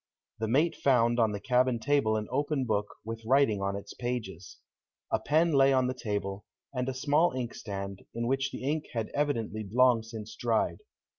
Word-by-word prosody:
The 110 - -1
mate 150 +9 +2
found 120 -3 +3
on 110 -2 +3
the 100 - -4
cabin 125 +2 +2
table 115 -3 +2
an 105 -1 -3
open 145 0 0
book, 105 -3 -1
with 115 0 -6
writing 120 -4 +3
on 100 0 -1
its 100 - -7
pages. 100 -7 -5 0.5
A - - +2
pen 160 +3 +2
lay 135 -1 +5
on 130 -1 +3
the 125 - -1
table, 105 -5 -3 0.3
and 125 0 -1
a - - -2
small 145 +5 +2
inkstand, 100 -6 -5 0.2
in 120 0 -2
which 135 +2 0
the - - -7
ink 150 +3 -1
had 115 -2 -2
evidently 115 -8 -1
long 125 -1 +5
since 110 -1 -8
dried. 115 -2 0
120 Hz, 180 wpm, -29 LUFS, 110-135 Hz, 0.5 s, lay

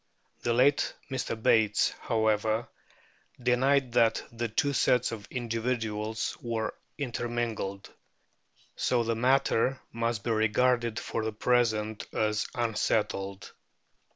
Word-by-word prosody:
The 120 - 0
late 140 +5 +3 0.2
Mr. 125 -3 -2
Bates, 110 -2 +3
however, 110 0 +1 0.7
denied 130 +2 +2
that 115 -1 +3
the 120 0 -2
two 140 +6 0
sets 125 -2 +2
of 105 -3 -7
individuals 115 -3 -2
were 115 -2 -2 0.2
intermingled, 120 -6 -3 0.8
so 120 -2 +1
the 115 0 0
matter 130 +1 +2
must 115 -2 -2
be 120 - -1
regarded 115 +1 +2
for 115 - -3
the 110 - -1
present 110 -2 +1
as 105 -1 +1
unsettled. 105 -4 -1
115 Hz, 105 wpm, -29 LUFS, 110-125 Hz, 0.8 s, late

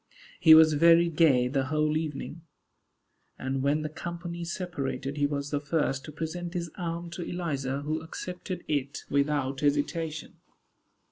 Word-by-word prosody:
He 160 -2 +9
was 160 -1 +7
very 170 +3 +6
gay 150 -6 +4
the 135 +1 0
whole 155 +2 +1
evening; 155 +1 -4 1.0
and 130 0 -2
when 145 +3 +1
the - - -1
company 170 +2 -6
separated, 145 -6 -4
he 145 0 +2
was 145 0 -3
the 145 - 0
first 145 -2 -1
to 155 - -8
present 170 +3 -5
his 170 -2 -3
arm 170 -1 -4
to 175 - -6
Eliza, 140 -6 -3
who 155 +2 -2
accepted 180 +2 -6
it 140 -2 -2
without 140 -1 +1
hesitation. 150 +2 -1
155 Hz, 145 wpm, -28 LUFS, 140-170 Hz, 1.0 s, He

